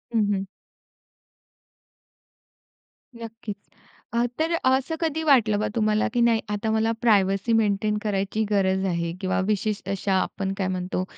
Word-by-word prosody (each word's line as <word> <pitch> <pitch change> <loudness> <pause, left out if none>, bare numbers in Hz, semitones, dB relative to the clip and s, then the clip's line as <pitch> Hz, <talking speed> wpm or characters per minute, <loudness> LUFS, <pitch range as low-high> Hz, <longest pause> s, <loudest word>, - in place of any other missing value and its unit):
हं, - - +4
हं. 195 -1 -1 2.7
नक्कीच. 225 -2 -7 0.6
अ, 235 0 +2 0.2
तर 325 +1 +1
असं 265 +5 +2
कधी 320 -1 -1
वाटलं, 235 -9 +4
का 215 - 0
तुम्हाला 215 -1 +2
की 240 - +2
नाही 230 -1 +3
आता 210 +1 -1
मला 220 +1 +1
प्रायव्हसी 200 -1 +3
मेंटेन 210 -1 +1
करायची 205 +1 -1
गरज 190 -1 +2
आहे? 170 -2 -1
किंवा 185 -1 0
विशेष 210 0 -1
अशा 195 0 -1
आपण 195 -1 -3
काय 190 -2 -1
म्हणतो, 185 0 -2
215 Hz, 135 wpm, -24 LUFS, 195-230 Hz, 2.7 s, हं